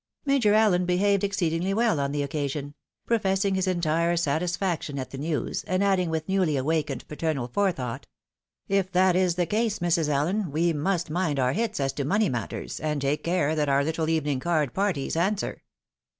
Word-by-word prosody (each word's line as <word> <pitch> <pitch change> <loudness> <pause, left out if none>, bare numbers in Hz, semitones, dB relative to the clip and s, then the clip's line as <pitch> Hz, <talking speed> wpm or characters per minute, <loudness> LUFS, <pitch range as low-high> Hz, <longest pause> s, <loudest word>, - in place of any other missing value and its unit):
Major 270 -7 +3
AUen 200 -5 +3
behaved 200 +2 +2
exceedingly 190 -1 0
well 225 -8 +2
on 140 0 -1
the 145 0 -1
occasion; 145 0 -3 0.3
pro 230 -1 +2
fessing 195 -1 +1
his 190 0 0
entire 170 -1 +1
satisfaction 170 0 -1
at 130 -1 -5
the 135 - -6
news, 150 -4 -2
and 185 +3 0
adding 190 -3 +2
with 160 -1 -2
newly 185 -6 +1
awakened 145 -1 -1
paternal 150 -5 -2
forethought, 135 -7 -2 0.3
" - - -59
If 195 -1 +1
that 185 0 +4
is 180 -2 +2
the 180 -1 +1
case, 215 +4 0
Mrs. 170 -3 +1
Allen, 165 +6 0
we 165 +3 +1
must 170 +2 -1
mind 165 -4 0
our 130 -1 +2
hits 220 -3 -1
as 135 -1 0
to 140 - -3
money 205 +9 +2
matters, 110 - -4
and 150 -2 -1
take 140 +2 -1
care 170 -3 +1
that 150 -2 0
our 140 0 +3
little 160 +1 -1
evening 150 -4 0
card 155 -4 0
parties 190 -9 -1
answer." 195 +5 -1
170 Hz, 185 wpm, -26 LUFS, 145-190 Hz, 0.3 s, that